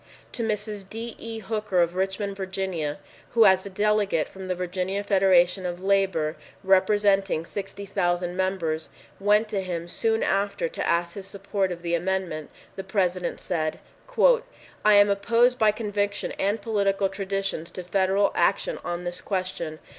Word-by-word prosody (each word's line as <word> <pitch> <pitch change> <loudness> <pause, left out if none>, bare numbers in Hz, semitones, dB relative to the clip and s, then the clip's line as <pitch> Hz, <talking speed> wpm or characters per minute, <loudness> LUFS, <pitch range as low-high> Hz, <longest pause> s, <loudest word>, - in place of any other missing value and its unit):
To - - -3
Mrs. 210 -3 -3
D. 230 +1 -6
E. 230 0 -6
Hooker 210 -3 -1
of 170 0 +3
Richmond, 195 +2 -2
Virginia, 190 -6 -3 0.4
who 225 -1 +7
as 190 0 +4
a - - -6
delegate 205 -4 +1
from 190 -1 -9
the 185 - -1
Virginia 185 +2 -2
Federation 190 -2 +4
of 175 -1 -3
Labor, 190 -5 +1 0.3
representing 195 -2 +3
60,000 185 -2 -2
members, 180 -4 -1 0.3
went 210 +2 +3
to 200 -3 -1
him 175 -2 -4
soon 225 +5 0
after 200 -2 0
to - - -4
ask 170 0 +1
his 195 -2 -7
support 195 -1 -2
of 170 -1 -6
the 170 0 -2
amendment, 175 -3 -1 0.3
the 195 - -5
President 185 -2 -1
said, 155 -3 -2 0.4
"I - - +2
am 205 0 +6
opposed 235 +5 +3
by 215 -1 +5
conviction 205 -2 -2
and 205 +3 +1
political 200 -3 +1
traditions 195 -3 -3
to 185 - -7
federal 190 +2 +2
action - - +1
on 175 0 -3
this 175 0 -4
question. 185 -5 -3
195 Hz, 150 wpm, -25 LUFS, 180-205 Hz, 0.4 s, who